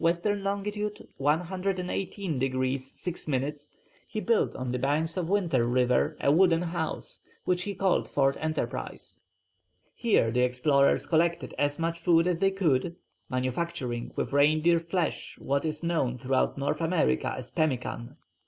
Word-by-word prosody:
long. 200 -1 -1 0.5
118 180 +2 -1
degrees 130 0 -1
6 180 +2 -6
minutes, 145 +1 -2 0.4
he 215 - -4
built 230 +1 +1
on 125 -1 -3
the 125 - -1
banks 150 +5 0
of 175 -2 -2
Winter 175 -11 +2
River 125 0 +2
a 140 - +3
wooden 170 +1 +4
house, 165 -2 -4 0.2
which 180 -1 +1
he 200 +2 -4
called 190 -1 +1
Fort 135 -1 +2
Enterprise. 150 - -4 0.7
Here 215 - +2
the 125 +1 +1
explorers 140 +3 +3
collected 170 +1 +1
as 145 0 +1
much 165 0 -2
food 165 0 +4
as 180 -2 0
they 195 - +4
could, 170 -4 0 0.3
manufacturing 130 -1 -2
with - - -2
reindeer 155 +4 +4
flesh 170 0 -2
what 140 +1 -1
is 155 0 -3
known 155 -8 0
throughout 130 +3 0
North 145 +3 -1
America 165 - +1
as 125 -1 -8
pemmican. 130 -5 -2
155 Hz, 140 wpm, -28 LUFS, 130-175 Hz, 0.7 s, wooden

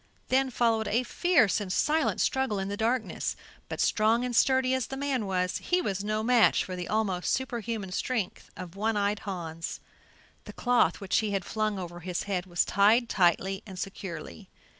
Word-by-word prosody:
Then 265 +1 +3
followed 225 -3 +1
a 230 +4 +1
fierce 255 - +2
and 190 -3 -4
silent 310 +10 +1
struggle 265 -6 +1
in 195 0 -3
the 200 - -2
darkness, 225 +3 -1 0.3
but - - -5
strong 225 +3 +2
and 245 -1 -3
sturdy 260 +1 +3
as 260 -3 0
the 270 - -6
man 270 -6 -1
was, 180 -1 -1
he 360 - +1
was 200 - -2
no 215 +1 -1
match 240 -1 +4
for 185 - -6
the 180 -1 -5
almost 200 -5 0
superhuman 230 -6 -3
strength 215 0 -3
of 180 -1 -8
One 215 +2 0
eyed 205 0 0
Hans. 165 -5 -5 0.7
The - - -9
cloth 245 -9 +2
which 195 - +1
he 215 -2 -1
had 195 -2 -1
flung 215 -2 -1
over 175 -2 -6
his 175 0 -3
head 190 -2 -2
was 175 -1 +1
tied 220 +5 +3
tightly 190 +1 +2
and 190 -2 -9
securely. 170 - -7
210 Hz, 185 wpm, -28 LUFS, 185-245 Hz, 0.7 s, match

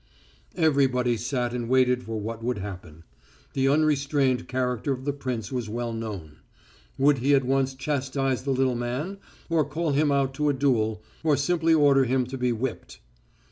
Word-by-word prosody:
Everybody 135 -7 +2
sat 120 +1 -2
and 120 -1 -3
waited 125 -1 +3
for 110 -2 -5
what 115 +2 -5
would 125 0 -1
happen. 90 -5 -8 0.5
The 135 0 +1
unrestrained 140 -3 +2
character 125 0 -1
of 130 0 -7
the 145 - 0
prince 125 -6 -4
was 125 -4 -3
well 120 +1 -3
known. 100 -10 -6 0.6
Would 140 0 +4
he 140 +3 +4
at 135 - +2
once 135 0 +1
chastise 135 -2 -1
the 140 - -5
little 130 -1 +2
man, 125 +11 -3 0.3
or 165 -2 +2
call 155 +3 -2
him 145 +1 +2
out 135 -1 +1
to 150 +2 0
a - - +2
duel, 110 -6 0 0.2
or 155 -3 +3
simply 165 +2 +2
order 140 -3 +5
him 130 +1 +1
to 130 +2 -6
be 125 0 +1
whipped? 120 +1 -4
130 Hz, 175 wpm, -26 LUFS, 120-140 Hz, 0.6 s, order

